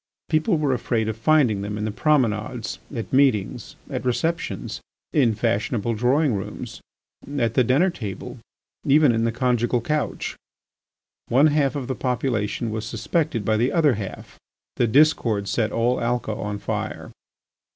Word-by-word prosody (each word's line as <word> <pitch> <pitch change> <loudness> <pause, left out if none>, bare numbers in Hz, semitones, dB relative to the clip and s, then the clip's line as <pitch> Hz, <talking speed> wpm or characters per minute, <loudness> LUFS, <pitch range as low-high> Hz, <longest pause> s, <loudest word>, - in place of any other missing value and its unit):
People 160 +3 +2
were 145 -3 +1
afraid 115 -2 -1
of 110 - -2
finding 120 -4 +3
them 105 +1 -4
in 105 - -2
the 110 - -2
promenades, 115 -4 0 0.2
at 115 +1 -5
meetings, 130 -8 +1
at - - -4
receptions, 160 +7 -2 0.3
in 120 -7 +3
fashionable 115 +1 0
drawing 125 +5 +2
rooms, 95 -2 -6 0.6
at 115 -4 +1
the 130 - +4
dinner 145 +10 +3
table, 105 - -7 0.4
even 145 -1 +5
in 115 0 +1
the 115 - +1
conjugal 120 0 +1
couch. 150 +5 -2 0.9
One 135 +5 +4
half 145 -2 +2
of 140 -3 -3
the 130 - -1
population 120 -4 -1
was 110 0 -3
suspected 125 - -1
by 110 +1 +2
the 120 +4 +1
other 155 -5 +4
half. 100 -3 -7 0.4
The 120 - +3
discord 115 -6 +3
set 110 +2 0
all 120 +2 +1
Alca 120 -2 -1
on 105 0 -4
fire. - - -4
120 Hz, 150 wpm, -23 LUFS, 110-140 Hz, 0.9 s, even